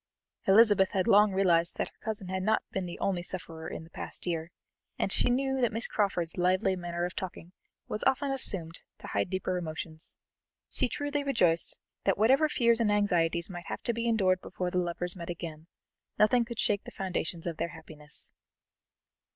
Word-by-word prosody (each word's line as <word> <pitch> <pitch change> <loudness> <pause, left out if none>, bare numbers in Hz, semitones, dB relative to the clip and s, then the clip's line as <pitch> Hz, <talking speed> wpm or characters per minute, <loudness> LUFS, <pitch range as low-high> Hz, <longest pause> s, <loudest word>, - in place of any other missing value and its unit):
Elizabeth 205 -1 +6
had 190 -2 +1
long 210 -1 +6
realized 175 -3 +2
that - - -1
her - - -32
cousin 215 -4 -3
had 185 0 -2
not 215 +3 +2
been 190 -2 -2
the 175 - -7
only 190 -3 0
sufferer 165 -3 -6
in - - -6
the 160 - -14
past - - -6
year, 165 -2 -2 0.5
and - - 0
she - - +4
knew 265 +1 +1
that 240 - +3
Miss 225 +2 0
Crawford's 185 -5 -1
lively 185 +2 +2
manner 175 -1 -3
of 180 - -5
talking 180 -3 -6 0.4
was 215 - -3
often 270 +1 +2
assumed 180 -11 +1 0.2
to - - -12
hide - - -1
deeper 185 -1 -1
emotions. 160 -1 -6 0.5
She - - +1
truly 290 +1 -2
rejoiced 180 -12 +2 0.3
that 195 - +3
whatever 265 +9 +4
fears 235 -4 +3
and 220 -3 +2
anxieties 175 -5 +2
might 175 -3 -8
have - - -5
to 235 - 0
be 230 +1 -2
endured 190 -5 +2
before 180 -1 -4
the 180 - +1
lovers 175 +1 -3
met 170 -2 -7
again, 165 -2 -6 0.5
nothing 235 +3 +4
could 235 -1 -7
shake 205 -2 +1
the - - -7
foundations 180 -3 -3
of 170 -2 -3
their - - -1
happiness. 155 -3 -6
185 Hz, 185 wpm, -30 LUFS, 170-220 Hz, 0.5 s, Elizabeth